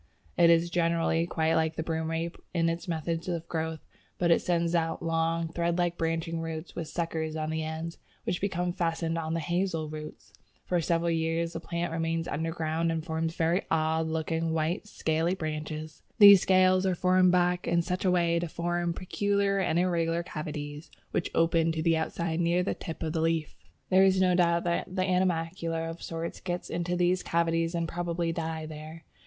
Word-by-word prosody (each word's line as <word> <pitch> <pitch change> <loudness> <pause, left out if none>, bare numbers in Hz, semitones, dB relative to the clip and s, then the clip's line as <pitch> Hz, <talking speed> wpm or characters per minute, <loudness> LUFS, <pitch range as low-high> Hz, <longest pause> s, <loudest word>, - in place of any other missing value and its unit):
It 170 -1 +5
is, 170 +1 +4
generally, 165 -1 +1
quite 160 -1 +1
like 160 0 +1
the 160 - -2
Broomrape 165 +1 -2 0.2
in 165 -1 +2
its 170 +3 -4
method 165 +1 -2
of 170 -2 -3
growth, 160 -1 -3 0.4
but 170 -1 +2
it - - +5
sends 170 -1 0
out 165 -1 0
long 165 0 0
thread 170 0 0
like 175 -1 +1
branching 165 0 -1
roots 160 0 -6
with 165 -2 -4
suckers 160 -1 -3
on 155 0 -2
the 160 0 -1
ends, 160 +1 -5 0.2
which 175 - -2
become 180 -3 -1
fastened 165 -1 -1
on 160 0 -2
the - - 0
Hazel 170 -1 -1
roots. 155 0 -9 0.3
For 175 -1 +1
several 170 +1 +1
years 165 +1 0
the 165 - -4
plant 170 0 -3
remains 165 0 -1
underground 165 +1 -1
and 160 -1 -3
forms 160 0 -2
very 170 +3 +2
odd 160 0 +1
looking, 160 +1 -1
white, 165 +6 -1
scaly 165 -1 0
branches. 155 -2 -5 0.2
These 200 -4 +10
scales 185 0 +4
are 185 -2 0
rolled 185 0 +5
back 180 0 +2
in 170 0 +2
such 180 +3 -2
a 190 - +3
way 170 -2 +2
as - - 0
to 175 - -2
form 170 +1 -2
peculiar 200 +1 0
and 175 -3 +1
irregular 170 -1 +1
cavities 150 -1 -6 0.2
which - - -1
open 165 0 +3
to 160 -1 -2
the 165 -1 +3
outside 160 +1 -2
near 175 +1 +2
the - - -1
tip 165 -3 -7
of 160 -1 -2
the 160 - 0
leaf. 165 -1 0 0.4
There 190 +1 +6
is 190 -1 +4
no 185 -1 +4
doubt 170 -1 +3
that 170 -1 -1
animalcula 170 -3 0
of 165 - -10
sorts 165 0 -5
get 175 -1 -4
into 175 +1 -1
these 180 +1 +2
cavities 165 0 0
and 170 -1 -1
probably 170 0 -2
die 160 -1 -3
there. 155 +1 -9
165 Hz, 185 wpm, -29 LUFS, 160-175 Hz, 0.4 s, These